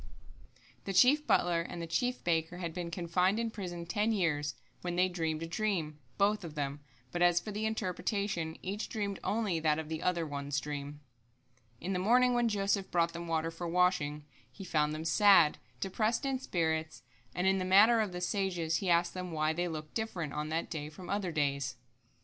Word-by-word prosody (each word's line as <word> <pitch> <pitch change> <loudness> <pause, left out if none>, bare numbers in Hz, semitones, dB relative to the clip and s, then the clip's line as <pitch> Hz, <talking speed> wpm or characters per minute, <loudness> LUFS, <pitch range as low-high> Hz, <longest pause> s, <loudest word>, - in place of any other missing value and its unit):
1] - - -16 0.8
The 195 - -3
chief 275 +10 +5
butler 170 -1 +3
and 170 +1 -6
the 170 - -3
chief 245 +10 -1
baker 165 0 0
had 170 -2 -4
been 175 -1 -4
confined 180 +3 +1
in 230 -1 -1
prison 175 -5 -6
ten 210 +6 0
years, 150 -8 0 0.3
when 175 -1 -3
they 180 +1 +4
dreamed 165 -3 -2
a - - -4
dream, 165 -5 -2 0.2
both 205 0 +2
of 160 -3 -8
them, 145 -1 -3 0.3
but 175 - -3
as 175 -1 +5
for 210 - -7
the 215 +2 -1
interpretation, 200 -5 -2
each 200 +4 -3
dreamed 200 -3 -3
only 210 -6 0
that 155 -1 +2
of 160 -1 -5
the 160 0 -3
other 175 -2 0
one's 140 -1 -2
dream. 145 0 -6 0.8
In 190 +3 -3
the 180 - 0
morning 245 +6 +4
when 240 -1 +2
Joseph 200 -2 0
brought 170 -1 +1
them 170 0 -5
the - - -5
water 165 0 0
for 170 +1 -5
washing, 165 -4 +1 0.3
he 195 - -10
found 150 -4 +1
them 160 +1 -5
sad, 170 -2 +5 0.2
depressed 215 +6 0
in 270 -1 0
spirits, 160 - -2 0.3
and, 180 +1 0
in 190 0 +3
the - - -1
manner 205 +5 +6
of 215 -3 0
the 180 0 -5
sages, 180 -4 0
he 190 - -2
asked 170 0 +3
them 180 -1 -5
why 155 0 +1
they 175 +2 -1
looked 155 -2 -6
different 180 -10 -3
on 150 +1 -3
that 160 +1 -2
day 150 -2 -4
from 175 +4 -9
other 200 -3 -1
days. 140 -3 -1
175 Hz, 200 wpm, -32 LUFS, 160-200 Hz, 0.8 s, manner